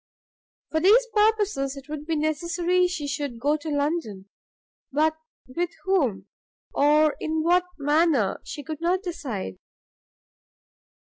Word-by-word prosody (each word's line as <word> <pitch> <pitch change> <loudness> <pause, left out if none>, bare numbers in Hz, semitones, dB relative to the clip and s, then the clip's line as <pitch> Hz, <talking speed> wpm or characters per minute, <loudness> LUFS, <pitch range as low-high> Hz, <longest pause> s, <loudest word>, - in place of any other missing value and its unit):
For 315 - +1
these 425 +9 +5
purposes 420 -11 +2
it 275 0 -10
would 300 0 -6
be 325 - 0
necessary 340 +4 +1
she 355 -5 -4
should 280 -4 -4
go 290 +5 +2
to 310 +1 -7
London: 285 - -2 0.6
but 310 +3 +2 0.3
with 340 +7 -2
whom, 270 - +1 0.5
or 300 +1 +4
in 315 0 -1
what 355 +2 +3
manner, 290 - +2
she 290 - -7
could 310 +2 -6
not 365 +3 +1
decide. 260 - -5
310 Hz, 125 wpm, -25 LUFS, 285-345 Hz, 0.6 s, these